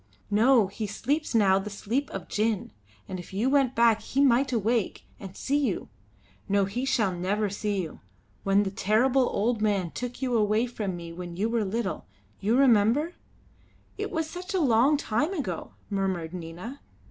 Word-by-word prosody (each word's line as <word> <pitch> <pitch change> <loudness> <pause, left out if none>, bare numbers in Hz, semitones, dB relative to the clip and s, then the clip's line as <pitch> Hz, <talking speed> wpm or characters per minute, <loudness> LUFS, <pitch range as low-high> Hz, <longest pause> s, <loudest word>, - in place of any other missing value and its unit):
"No, 230 +2 +5
he 205 +3 -5
sleeps 280 +7 -2
now 195 -3 +5
the 205 +2 -5
sleep 225 +7 -2
of - - -6
gin; 215 -1 -1 0.4
and 185 - -5
if 175 - -10
you 230 +7 +1
went 270 -3 +3
back 230 -1 +4
he 270 - -3
might 270 -1 +4
awake 230 -2 0 0.2
and 195 -1 -9
see 280 +2 0
you. 280 - -1 0.6
No, 200 0 +3
he 240 +7 -3
shall 220 -7 +2
never 195 +3 -1
see 200 -2 -1
you. 160 - -8 0.4
When 195 +1 +3
the 195 - -3
terrible 245 +7 +2
old 225 +2 0
man 200 -5 +1
took 245 0 -5
you 255 -3 0
away 215 +1 +2
from 210 -6 -4
me 170 -1 -8
when 175 0 -7
you 215 +4 0
were 230 -1 +1
little, 225 +4 -3 0.3
you 220 +5 +2
remember 260 +5 +4 0.4
" - - -33
"It - - -2
was 320 -1 -2
such 365 +4 -6
a - - +2
long 270 0 +4
time 290 - -1
ago," 190 - -4
murmured 190 -5 -2
Nina. 180 +10 -7
220 Hz, 180 wpm, -27 LUFS, 195-255 Hz, 0.6 s, No